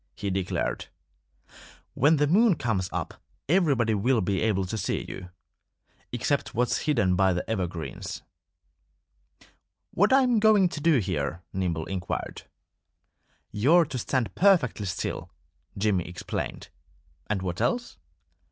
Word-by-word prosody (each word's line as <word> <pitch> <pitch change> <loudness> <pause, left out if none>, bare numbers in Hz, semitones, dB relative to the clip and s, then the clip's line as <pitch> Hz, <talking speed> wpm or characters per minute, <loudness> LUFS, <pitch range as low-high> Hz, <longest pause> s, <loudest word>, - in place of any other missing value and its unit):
he 100 -2 -3
declared. 95 -10 -2 1.1
"When 145 +5 +4
the 150 0 +2
moon 200 +6 +4
comes 100 -9 -1
up - - -5 0.3
everybody 140 - +2
will 115 +4 +2
be 95 -1 0
able 100 -4 +1
to 95 - -4
see 110 - -2
you 90 -1 -8 0.8
except - - -1
what's 125 +1 +1
hidden 115 -11 +2
by 95 0 +3
the 90 - -3
evergreens." 90 -7 -4 1.7
"What 205 +6 +2
am 255 -3 +4
I - - +4
going 210 -4 +5
to 150 - -6
do 165 -2 +4
here?" 90 -4 -2
Nimble 85 -4 -2
inquired. 95 -2 -5 1.0
"You're 155 +12 +4
to 140 -4 -5
stand 115 -4 -1
perfectly 155 - +3
still," 90 - -4 0.5
Jimmy 95 -3 +1
explained. 90 0 -5 0.6
"And 100 -3 -2
what 90 -2 -3
else?" 240 0 -1
110 Hz, 125 wpm, -26 LUFS, 95-155 Hz, 1.7 s, going